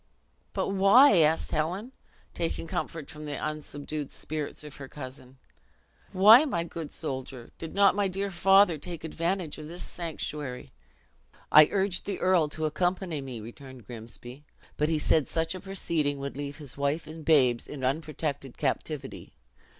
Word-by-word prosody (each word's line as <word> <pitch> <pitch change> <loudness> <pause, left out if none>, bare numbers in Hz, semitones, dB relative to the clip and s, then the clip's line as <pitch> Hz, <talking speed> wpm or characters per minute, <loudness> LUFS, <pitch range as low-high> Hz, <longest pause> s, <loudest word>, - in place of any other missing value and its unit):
"But - - -1
why," 200 +6 +7
asked 160 0 +3
Helen, 180 +10 -2 0.4
taking 165 0 -2
comfort 160 -2 -4
from 150 0 -9
the 145 -1 -4
unsubdued 150 -1 -4
spirits 155 -1 -5
of 150 -1 -10
her 135 -2 -8
cousin, 130 -1 -9 0.7
"why, 215 +8 +8
my 175 - -1
good 165 -2 -7
soldier, 130 -5 -5
did 165 - -7
not 200 -1 +6
my 200 0 +1
dear 195 +1 -3
father 195 -2 +5
take 170 +1 -7
advantage 165 0 -2
of 150 - -8
this 175 +3 -6
sanctuary?" 150 - -5 0.8
"I 155 0 +9
urged 195 -2 0
the 200 - -2
earl 180 -5 +3
to 155 +1 -3
accompany 175 0 -1
me," 130 -4 -7
returned 125 +1 -11
Grimsby; 120 +3 -7 0.3
"but 150 +1 +1
he 160 - +1
said 150 0 +2
such 165 +1 -1
a 185 - -6
proceeding 170 -7 -1
would 140 0 -5
leave 145 0 -5
his 145 -5 -8
wife 140 +3 0
and 155 +1 -9
babes 130 -7 +3
in 140 -3 -7
unprotected 140 -1 -2
captivity. 140 0 -3
155 Hz, 155 wpm, -28 LUFS, 140-175 Hz, 0.8 s, I